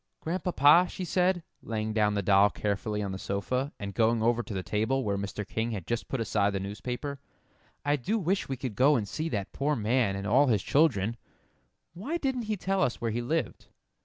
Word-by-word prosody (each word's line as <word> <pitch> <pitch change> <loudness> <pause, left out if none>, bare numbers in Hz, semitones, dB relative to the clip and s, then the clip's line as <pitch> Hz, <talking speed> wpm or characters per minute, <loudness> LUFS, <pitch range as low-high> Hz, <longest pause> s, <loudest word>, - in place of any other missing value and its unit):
"Grandpapa," 170 -1 +4
she 185 - -5
said, 180 0 +1 0.2
laying 110 -1 -3
down 105 -1 +2
the 100 - 0
doll 100 +1 +5
carefully 105 +1 -2
on 100 - -3
the 95 - -5
sofa, 125 +10 -2
and 100 -1 -5
going 115 0 +2
over 120 +1 +2
to 115 - -7
the 95 - -2
table 110 +7 0
where 100 -3 0
Mr. 100 +1 -4
King 115 +1 -2
had 100 -7 -4
just 120 0 -2
put 135 - -3
aside 100 -1 +1
the 95 - -1
newspaper, 125 +8 -5 0.7
"I 145 +1 +2
do 200 - -1
wish 190 -3 -1
we 135 - -2
could 125 -3 -4
go 135 +8 +4
and 110 -5 -1
see 155 +10 -3
that 100 -7 -3
poor 150 +2 0
man 115 -2 +1
and 100 0 -4
all 130 +7 +4
his 105 -7 +2
children 120 -8 +2 0.8
why 230 - -3
didn't 265 -6 -2
he 215 - 0
tell 195 +1 0
us 125 - 0
where 115 -1 -1
he 120 +2 -2
lived?" 155 +7 -2
120 Hz, 210 wpm, -29 LUFS, 105-150 Hz, 0.8 s, doll